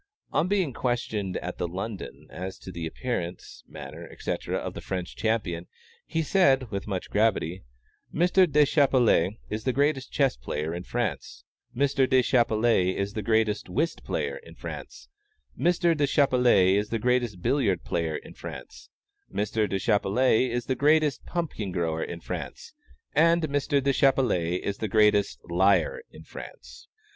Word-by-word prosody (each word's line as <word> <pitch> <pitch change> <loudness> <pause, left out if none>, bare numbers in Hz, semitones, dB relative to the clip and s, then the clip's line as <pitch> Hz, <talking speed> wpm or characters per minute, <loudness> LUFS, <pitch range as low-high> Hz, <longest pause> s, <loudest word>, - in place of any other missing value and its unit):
On - - +1
being 185 -8 +1
questioned 110 -7 -2
at 90 - -5
the 90 - -1
"London" 95 +4 -6
as 95 +3 -6
to 95 - -10
the 85 -2 -4
appearance, 90 -3 -5
manner, - - -9
etc., - - -3
of - - -4
the - - -7
French 90 -2 -4
champion, 100 -7 -1 0.4
he 160 - -1
said, 135 - +3
with 100 0 -4
much 95 -3 -4
gravity 100 -5 +1 0.5
"Mr. 180 +1 +3
Deschappelles 135 - +4 0.2
is 105 +1 -3
the 130 - +1
greatest 140 0 0
chess 135 -3 +2
player 75 +6 -4
in 85 - -4
France; 120 -2 -3 0.3
Mr. 135 -1 +2
Deschappelles 115 -6 +3
is 100 +1 -2
the 110 - -3
greatest 110 -1 +1
whist 155 - -1
player - - -2
in - - -14
France; 65 - -8 0.5
Mr. 170 +3 +2
Deschappelles 125 - +4
is 105 - -3
the 115 - 0
greatest 120 -5 0
billiard 105 - +1
player 80 -2 -1
in - - -12
France; - - -10 0.4
Mr. 105 0 0
Deschappelles 110 +5 +2
is 120 0 -2
the 130 - 0
greatest 150 0 +2
pumpkin 155 - -3
grower 85 -3 -1
in 85 - -6
France, - - -7 0.4
and 165 +2 +4
Mr. 145 -1 +1
Deschappelles 130 -10 +2
is 100 0 -2
the 110 - -1
greatest 105 -1 +3
liar 90 0 +2
in - - -13
France." 60 0 -11
110 Hz, 145 wpm, -27 LUFS, 95-135 Hz, 0.5 s, Deschappelles